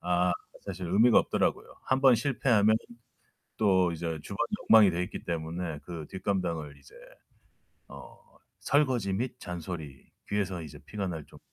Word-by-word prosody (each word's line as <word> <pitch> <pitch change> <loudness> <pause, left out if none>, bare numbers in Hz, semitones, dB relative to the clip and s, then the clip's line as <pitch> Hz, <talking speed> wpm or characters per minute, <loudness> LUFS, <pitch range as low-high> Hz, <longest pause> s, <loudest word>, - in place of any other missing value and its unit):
아, 90 0 +2 0.3
사실 95 -2 -6
의미가 110 +7 +5
없더라고요. - - -1
한 130 0 +1
번 130 -3 +7
실패하면 115 -4 +3 0.8
또 95 -4 +3
이제 80 -1 -3
주방이 100 - -2 0.2
엉망이 110 -3 +8
돼 90 +1 -1
있기 - - -8
때문에 85 -1 -3
그 85 -3 -7
뒷감당을 85 -7 -2
이제 70 - -19 0.9
어 70 -1 -12 0.4
설거지 130 -9 +1
및 120 +6 -3
잔소리. 85 -6 -7 0.2
귀에서 95 -4 -1
이제 75 -2 -10
피가 100 -2 -4
날 80 -5 -5
정도로 - - -16
90 Hz, 300 characters per minute, -29 LUFS, 85-105 Hz, 0.9 s, 엉망이